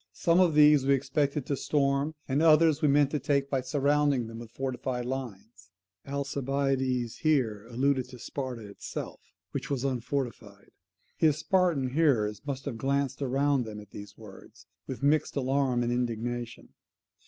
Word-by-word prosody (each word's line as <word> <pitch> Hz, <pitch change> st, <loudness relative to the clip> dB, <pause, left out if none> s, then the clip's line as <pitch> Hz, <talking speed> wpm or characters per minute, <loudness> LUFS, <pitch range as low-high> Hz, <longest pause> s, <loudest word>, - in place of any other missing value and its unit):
Some 170 Hz, +1 st, +3 dB
of 175 Hz, -5 st, +4 dB
these 150 Hz, -2 st, +6 dB
we 140 Hz, +1 st, +4 dB
expected 140 Hz, +1 st, -1 dB
to 140 Hz, -, -1 dB
storm 140 Hz, +2 st, 0 dB
and 140 Hz, +3 st, +1 dB
others 160 Hz, -1 st, +5 dB
we 150 Hz, -, +3 dB
meant 145 Hz, 0 st, +4 dB
to 150 Hz, -, -1 dB
take 140 Hz, -2 st, 0 dB
by 135 Hz, -2 st, +1 dB
surrounding 140 Hz, 0 st, +1 dB
them 115 Hz, 0 st, -8 dB
with 115 Hz, -1 st, -9 dB
fortified 130 Hz, 0 st, -3 dB
lines. 115 Hz, -6 st, -7 dB, 0.4 s
[Alcibiades 135 Hz, -3 st, -1 dB
here 115 Hz, -9 st, 0 dB
alluded 130 Hz, +1 st, 0 dB
to 125 Hz, -, -11 dB
Sparta 125 Hz, -3 st, -6 dB
itself, 100 Hz, -, -7 dB, 0.3 s
which -, -, -5 dB
was 135 Hz, -3 st, -1 dB
unfortified. 125 Hz, -6 st, -4 dB, 0.5 s
His 155 Hz, -3 st, +3 dB
Spartan 160 Hz, -6 st, +1 dB
hearers 115 Hz, -9 st, +2 dB
must 135 Hz, -1 st, -4 dB
have 125 Hz, -6 st, -5 dB
glanced 140 Hz, +1 st, -1 dB
round 135 Hz, 0 st, +1 dB
them 110 Hz, -2 st, -7 dB
at 105 Hz, -1 st, -14 dB
these 100 Hz, 0 st, -10 dB
words, 105 Hz, -3 st, -14 dB, 0.2 s
with 130 Hz, +1 st, -6 dB
mixed 150 Hz, +2 st, +2 dB
alarm 130 Hz, -2 st, +1 dB
and 120 Hz, -, -1 dB
indignation. 120 Hz, 0 st, -3 dB
135 Hz, 155 wpm, -28 LUFS, 120-140 Hz, 0.5 s, these